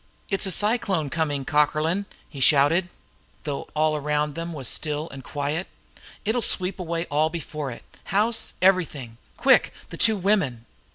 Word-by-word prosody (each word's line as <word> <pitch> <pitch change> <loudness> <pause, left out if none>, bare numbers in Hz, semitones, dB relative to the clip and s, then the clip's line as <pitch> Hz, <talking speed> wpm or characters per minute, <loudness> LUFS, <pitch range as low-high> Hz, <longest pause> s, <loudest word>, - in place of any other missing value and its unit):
"It's 195 0 -1
a - - -2
cyclone 200 - 0
coming, 145 -4 -1
Cockerlyne!" 155 +6 +1 0.2
he 140 - -10
shouted, 150 +6 +4 0.5
though 145 -2 -4
all 155 0 +2
around 150 0 0
them 165 +2 -5
was 140 -6 -4
still 150 0 -1
and 135 -1 -9
quiet. 145 +6 -2 0.6
"It'll 225 +3 +1
sweep 185 -2 -1
all 165 -3 0
before 155 -3 -5
it 120 - -9 0.2
house, 215 +5 +1
everything! 155 -11 +2 0.2
Quick - - +4 0.2
the - - -7
two 220 -2 +5
women!" 180 - +1
155 Hz, 145 wpm, -25 LUFS, 145-185 Hz, 0.6 s, two